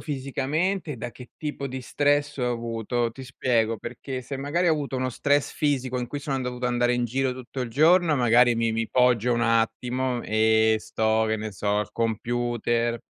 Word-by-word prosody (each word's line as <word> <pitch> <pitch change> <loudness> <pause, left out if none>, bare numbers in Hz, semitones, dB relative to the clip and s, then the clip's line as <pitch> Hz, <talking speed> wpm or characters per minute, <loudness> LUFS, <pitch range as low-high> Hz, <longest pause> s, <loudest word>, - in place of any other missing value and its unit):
fisicamente 150 +5 -2
e - - -7
da 115 +2 -5
che 125 0 -13
tipo 145 -2 -4
di 130 0 -5
stress 145 +3 +1
ho 125 -2 0
avuto. 115 0 -2
Ti 130 +3 -10
spiego, 115 -3 0
perché 125 +3 -6
se 140 +3 -5
magari 160 +6 0
ho - - +5
avuto 145 -3 -3
uno 130 0 -1
stress 145 +3 +1
fisico 130 -4 -1
in 125 - -3
cui 145 +3 -5
sono 140 -1 -2
an 130 - -2
dovuto 125 0 -3
andare 120 0 +2
in 120 0 0
giro 130 +2 0
tutto 130 +1 -7
il 125 - -2
giorno, 160 +5 +4
magari 120 -1 +4
mi 115 0 +1
mi 115 0 -2
poggio 125 -1 +3
un 120 - 0
attimo 120 +2 0
e 110 0 +3
sto, 110 +1 0
che 110 - +1
ne 110 0 -4
so, 100 +1 -1
al 105 - -3
computer, 120 +1 -1
125 Hz, 195 wpm, -25 LUFS, 115-135 Hz, -, ho